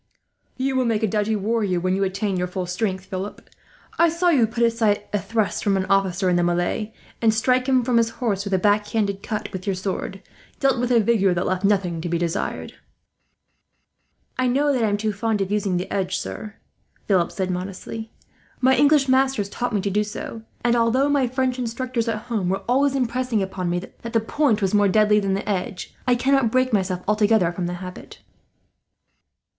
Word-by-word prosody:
"You 265 +1 -1
will 260 -1 +2
make 225 -2 0
a - - +3
doughty 210 +2 0
warrior 205 -3 0
when 185 +1 0
you 195 - 0
attain 195 +1 -1
your 180 0 -1
full 180 0 -4
strength, 190 +1 -2
Philip. 190 +1 -6 0.5
I 335 0 +6
saw 340 +2 +1
you 260 -9 +4
put 235 +2 -1
aside 225 -3 +2
a 205 - +2
thrust 220 0 -1
from 200 -2 +2
an 190 - -1
officer 195 -1 +2
in 180 -1 +3
the 175 - +2
melee, 175 +5 0 0.3
and 225 -1 +4
strike 250 +3 +1
him 260 -2 +3
from 240 0 +1
his 230 -1 +3
horse 205 -6 -1
with 200 -1 -1
a - - +3
backhanded 205 0 +1
cut 215 -1 -4
with 185 +1 -6
your 195 - +1
sword, 190 +1 -4 0.4
dealt 270 -2 +2
with 245 0 0
a 240 - +5
vigour 200 -4 +2
that 175 - -1
left 185 +1 -1
nothing 190 -5 +1
to 175 - -4
be 170 - 0
desired." 170 -1 -3 1.7
"I 255 - +2
know 280 +4 +2
that 250 -3 +1
I - - +3
am 205 - 0
too 215 0 -1
fond 220 +1 -1
of 195 0 -2
using 200 -3 0
the 180 - -4
edge, 190 -1 -1
sir," 210 +2 -6 0.5
Philip 185 -4 +2
said, 185 -2 -2
modestly. 195 +5 -6 0.5
"My 260 +1 +4
English 285 +1 +4
masters 260 -5 +2
taught 245 +4 -3
me 205 - 0
to 200 - -2
do 210 +2 +2
so 210 +1 -7 0.2
and, 240 0 +4
although 240 +4 +2
my 280 -3 +2
French 255 0 -1
instructors 245 0 -2
at 220 -1 -2
home 220 -7 -2
were 195 +1 -1
always 275 +3 +2
impressing 250 -4 0
upon 190 -2 -3
me 175 - 0
that 225 +6 -8
the 225 - +4
point 225 -1 +1
was 190 - 0
more 205 -1 +4
deadly 210 +1 +4
than 195 -1 0
the 195 - -4
edge, 185 -2 -3
I 250 - +4
cannot 265 -1 +2
break 255 0 +1
myself 185 -3 0
altogether 210 -3 +3
from 175 0 -3
the 175 - -3
habit." 180 - -11
210 Hz, 205 wpm, -23 LUFS, 190-240 Hz, 1.7 s, I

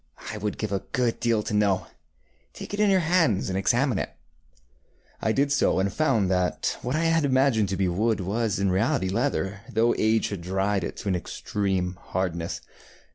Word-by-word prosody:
I - - -6
would 105 -1 -3
give 110 -2 -3
a 100 - 0
good 125 -4 0
deal 115 -3 +1
to - - -4
know. 100 -3 +2 0.7
Take - - -9
it 205 - -3
in 210 -1 +4
your 190 -1 +4
hands 160 - +2
and 95 - -2
examine 120 +2 +2
it. - - -2
ŌĆØ - - -36 0.3
I 110 - +1
did 140 +4 +1
so, 145 - +2
and 95 0 0
found 115 -8 +2
that 90 -1 0
what 125 +3 -2
I 160 - +1
had 165 -1 +3
imagined 130 -6 +3
to 95 - -2
be 95 - +1
wood 105 +6 +1
was 105 +3 -1
in 100 -1 +1
reality 105 +1 +1
leather, 100 -3 -1
though 115 +1 +3
age 110 +1 +2
had 100 -4 -5
dried 95 +2 0
it - - -4
into 100 - -4
an 95 - +1
extreme 95 0 -2
hardness. 85 -2 -3
105 Hz, 195 wpm, -26 LUFS, 95-130 Hz, 0.7 s, in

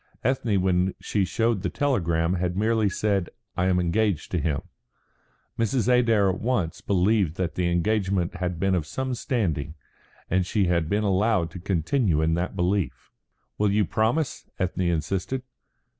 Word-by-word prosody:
Ethne, 120 -5 +1
when 95 0 +1
she 100 - 0
showed 115 +3 0
the 90 - -1
telegram, 85 - +1
had 90 0 -1
merely 110 0 +2
said, 100 -2 0 0.3
"I 90 +1 +1
am 90 -1 +3
engaged 90 0 0
to 90 - 0
him." 75 -2 -1 1.0
Mrs. 115 +1 +1
Adair 115 -5 +4
at 95 0 0
once 110 -9 -1
believed 95 -3 +2
that 90 -2 -2
the 90 -1 0
engagement 95 0 0
had 90 -2 -3
been 95 +1 +1
of 85 -5 0
some 130 +5 -3
standing, 85 - -2 0.5
and 90 +1 +2
she 100 +2 +1
had 85 -3 +1
been 105 +3 +1
allowed 100 -3 +2
to 90 - -8
continue 95 - +1
in 80 +1 +2
that 85 +3 -2
belief. 95 +1 -1 0.5
"You 105 0 +3
will - - -4
promise?" 120 +7 0
Ethne 90 0 -1
insisted. 95 +9 -1
95 Hz, 160 wpm, -25 LUFS, 85-110 Hz, 1.0 s, Adair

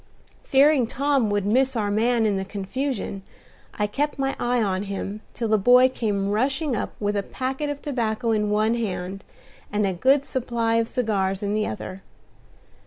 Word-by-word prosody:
Fearing 275 -2 +4
Tom 275 -2 +1
would 205 -1 0
miss 260 +5 +2
our 210 -3 0
man 225 +2 +2
in 210 -2 +2
the 190 - -1
confusion, 205 +2 -4 0.5
I 210 - 0
kept 285 +9 -2
my 270 0 -1
eye 245 0 +1
on 195 -4 0
him 200 +1 -5
till 235 - -2
the 215 -1 +3
boy 250 +5 +6
came 205 -5 -1
rushing 270 +5 0
up - - -3
with 205 0 -1
a 200 - +1
packet 265 +7 -3
of 290 -1 -5
tobacco 235 -4 -1
in 210 -1 +1
one 215 +2 +2
hand 195 -4 -3 0.5
and 210 0 +1
a 190 - 0
good 270 +9 +3
supply 235 -3 0
of 230 0 +1
cigars 200 -6 -1
in 205 0 -1
the 215 0 0
other. 190 -2 -6
225 Hz, 175 wpm, -24 LUFS, 205-260 Hz, 0.5 s, boy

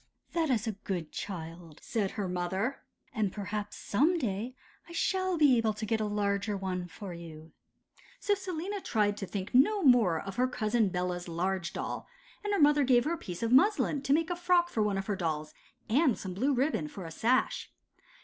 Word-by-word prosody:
'That 330 -3 +1
is 230 -5 +1
a 225 - 0
good 175 -5 -3
child,' 165 -3 -7
said 210 -5 -1
her 200 -2 -1
mother; 190 +8 -2 0.3
'and 215 -5 0
perhaps 205 +1 -4
some 305 - +2
day 235 - -2 0.3
I - - -9
shall 375 +1 0
be 280 -6 +5
able 220 -1 +1
to 215 +1 -5
get 220 +1 0
a - - +1
larger 205 0 0
one 185 -2 -3
for 190 +1 -8
you.' 160 -2 -10 0.7
So 410 - +2
Selina 380 0 -4
tried 210 - +1
to 195 - -5
think 190 -1 -5
no 380 +11 +4
more 230 - +5
of 195 +2 -7
her 255 +1 +3
Cousin 225 -3 +1
Bella's 180 0 -2
large 180 +1 -1
doll, - - -4 0.4
and 415 - -2
her 405 - +1
mother 295 -1 +5
gave 245 -1 +4
her 320 - +1
a - - -2
piece 180 - -6
of 230 - 0
muslin 295 0 +4
to 270 - -2
make 320 +3 +3
a - - 0
frock 350 0 +3
for 225 - -1
one 210 -2 +1
of 195 - -3
her 205 - -1
own 195 - -5
dolls, 155 -3 -2 0.3
and 260 +1 +3
some 190 -2 -5
blue 255 +10 +1
ribbon 255 - 0
for 185 +4 -8
a 165 - -7
sash. 245 +9 +1
215 Hz, 205 wpm, -30 LUFS, 185-280 Hz, 0.7 s, be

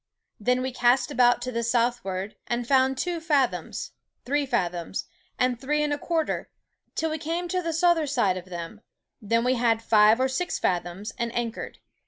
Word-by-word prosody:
Then 250 +4 +1
we 260 - -2
cast 245 +3 +3
about 245 -3 +4
to 255 - -3
the 235 -1 -1
southward, 230 -5 -1
and 240 0 -2
found 265 0 +3
two 350 +3 -1
fathoms, 295 -5 0 0.3
three 285 +2 0
fathoms, 180 -7 -2 0.3
and 250 -1 +1
three 300 +2 +1
and 295 -1 0
a 290 - -3
quarter, 325 -1 -1 0.5
till 320 0 -1
we 315 - -3
came 335 +3 -2
to 365 +1 0
the 335 -1 -2
souther 330 -1 +3
side 235 -9 +2
of 185 -1 -6
them, 180 +3 -7 0.4
then 230 +2 +1
we 250 +1 +3
had 235 -2 +2
five 215 +1 +5
or 260 - +3
six 265 +7 -2
fathoms, 180 +3 -2
and 235 0 -1
anchored. 235 -1 -3
245 Hz, 180 wpm, -26 LUFS, 225-290 Hz, 0.5 s, five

